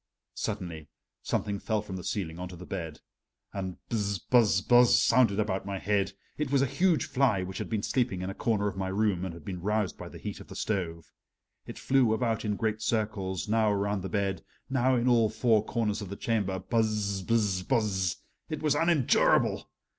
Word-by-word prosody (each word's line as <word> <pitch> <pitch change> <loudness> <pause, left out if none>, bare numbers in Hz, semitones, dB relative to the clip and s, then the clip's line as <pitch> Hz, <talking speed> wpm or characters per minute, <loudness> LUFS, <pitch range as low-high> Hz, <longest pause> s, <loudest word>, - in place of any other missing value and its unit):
Suddenly 85 -7 -4 0.3
something 100 -1 -2
fell 110 0 -1
from 95 -3 -7
the 90 - -6
ceiling 85 -5 -3
onto 90 0 -6
the 90 +2 -10
bed, 80 -5 -6 0.5
and 95 -2 -4
"buzz 100 -3 -1
buzz 105 -5 +3
buzz" 120 +1 +6
sounded 115 -4 +4
about 95 -3 0
my 100 0 -4
head. 100 0 0 0.3
It 150 -3 -1
was 140 -1 +4
a - - +3
huge 175 +5 +2
fly 125 -8 +2
which 95 +1 -6
had - - -4
been 110 -2 -1
sleeping 120 -8 0
in 95 - -3
a - - -6
corner 105 -1 0
of 100 - -3
my 95 -1 -2
room 95 -2 0
and 95 - -3
had 85 -2 -12
been 90 -3 -5
roused 105 0 -1
by - - -7
the - - -11
heat - - -6
of - - -12
the - - -10
stove. 85 -6 -3 0.6
It - - -8
flew 130 -5 +3
about 115 -1 -1
in 105 -2 -1
great 110 0 -1
circles, 105 -5 -1
now 110 0 +3
around 100 0 0
the 95 - -5
bed, 100 -2 -1 0.3
now 130 0 +3
in 120 +1 +1
all 115 -3 +4
four 110 -1 +2
corners 110 -2 -1
of 100 - -6
the 100 - -5
chamber 100 -4 -1
"buzz 105 -3 0
buzz 105 -3 +1
buzz" 95 -5 0 0.3
it 155 0 -4
was 150 -2 +3
unendurable! 165 -3 +3
105 Hz, 200 wpm, -29 LUFS, 95-115 Hz, 0.6 s, buzz